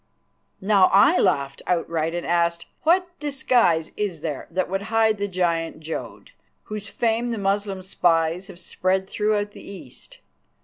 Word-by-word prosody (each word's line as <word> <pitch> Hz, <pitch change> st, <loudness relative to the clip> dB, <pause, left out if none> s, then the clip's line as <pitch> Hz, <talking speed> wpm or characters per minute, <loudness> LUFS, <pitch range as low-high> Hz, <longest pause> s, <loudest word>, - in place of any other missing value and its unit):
Now 195 Hz, -1 st, +4 dB
I 195 Hz, +1 st, +6 dB
laughed 140 Hz, -7 st, +1 dB
outright 165 Hz, -2 st, 0 dB
and 175 Hz, -, -3 dB
asked, 170 Hz, 0 st, +1 dB, 0.2 s
"What 360 Hz, +3 st, +3 dB
disguise 250 Hz, -, +1 dB
is 190 Hz, -7 st, -3 dB
there 150 Hz, -4 st, -4 dB
that 185 Hz, +2 st, -1 dB
would 195 Hz, +2 st, -2 dB
hide 220 Hz, -2 st, +2 dB
the 205 Hz, -, -1 dB
giant 170 Hz, -4 st, -1 dB
Jodd, 160 Hz, -, -7 dB, 0.3 s
whose 210 Hz, -2 st, -6 dB
fame 230 Hz, +3 st, 0 dB
the 230 Hz, -, -2 dB
Moslem 195 Hz, -1 st, -1 dB
spies 170 Hz, 0 st, +1 dB
have 185 Hz, -4 st, -12 dB
spread 190 Hz, +1 st, -1 dB
throughout 210 Hz, 0 st, 0 dB
the -, -, -12 dB
East? 200 Hz, -, -11 dB
190 Hz, 145 wpm, -23 LUFS, 170-210 Hz, 0.3 s, I